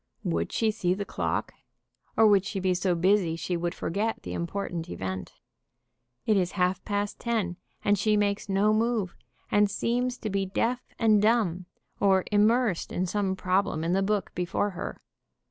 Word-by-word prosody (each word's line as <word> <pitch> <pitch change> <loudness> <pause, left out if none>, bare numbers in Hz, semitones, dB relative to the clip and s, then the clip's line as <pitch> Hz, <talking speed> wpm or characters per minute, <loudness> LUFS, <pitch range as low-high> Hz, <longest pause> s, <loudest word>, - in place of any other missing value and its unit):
Would 85 0 -1
she 220 -1 +1
see 180 -4 0
the 200 +1 -4
clock, - - -2 0.6
or 225 - +6
would 200 -3 +5
she 200 0 -3
be 185 -1 +1
so 180 0 +1
busy 180 -1 +2
she 175 +2 -3
would 170 0 -2
forget 215 +6 -2
the - - -5
important 170 -1 -3
event? 95 - -5 0.9
It 215 -2 +3
is 180 -1 0
half 185 -1 0
past 205 0 -2
ten, 215 -7 -1 0.3
and 205 -1 +3
she 215 +1 +3
makes 205 0 0
no 200 +2 +3
move, 220 -4 0 0.4
and 205 0 +4
seems 245 +4 -1
to 215 - -4
be 195 0 +1
deaf 235 +6 0 0.2
and 215 -3 +4
dumb, 205 -6 +2 0.3
or 190 -2 +4
immersed 215 -1 +2
in 185 - -1
some 195 0 -1
problem 185 -4 0
in 170 +2 0
the 195 - +2
book 205 0 -1
before 180 +3 -1
her. 180 - -6
200 Hz, 170 wpm, -27 LUFS, 180-215 Hz, 0.9 s, or